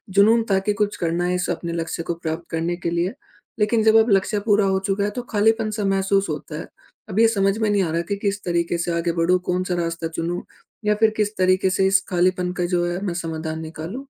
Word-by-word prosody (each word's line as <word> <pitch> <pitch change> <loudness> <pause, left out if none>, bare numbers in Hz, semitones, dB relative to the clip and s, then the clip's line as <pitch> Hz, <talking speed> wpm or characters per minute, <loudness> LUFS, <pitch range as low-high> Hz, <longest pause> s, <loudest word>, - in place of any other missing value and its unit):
जुनून 225 +3 +5
था 195 - +4
कि 210 - +3
कुछ 205 0 -1
करना 170 +1 -1
है 180 0 0
इस 180 0 -2
अपने 170 0 -4
लक्ष्य 165 0 -3
को 170 - -2
प्राप्त 165 0 -4
करने 165 +2 -1
के 175 - -2
लिए। 175 +4 0 0.5
लेकिन 215 +1 +2
जब 220 0 +5
अब 230 - -3
लक्ष्य 200 +2 +2
पूरा 210 -2 +4
हो 190 0 +2
चुका 200 +1 0
है 205 - +1
तो 245 - -2
खालीपन 220 +1 +2
सा 205 - 0
महसूस 195 0 +1
होता 150 0 -5
है। - - -7 0.4
अब 200 - -1
ये 230 - +7
समझ 195 -2 +1
में 220 -1 +1
नहीं 205 -2 +2
आ 165 - -2
रहा 165 +1 0
कि 200 - +1
किस 200 0 -2
तरीके 170 -1 0
से 170 0 -1
आगे 170 0 0
बढ़ूँ? 175 +2 +2
कौन-सा 180 0 -1
रास्ता 170 -1 -2
चुनूँ 165 +2 -3 0.4
या 210 0 +3
फिर 220 +1 +4
किस 210 0 0
तरीके 185 +1 +3
से 190 +1 +2
इस 195 0 +4
खालीपन 180 0 +1
का 175 - +2
जो 175 0 +1
है 175 +2 -3
मैं 180 - -1
समाधान 160 -2 -4
निकालूँ? 165 - -7
185 Hz, 240 wpm, -22 LUFS, 170-205 Hz, 0.5 s, ये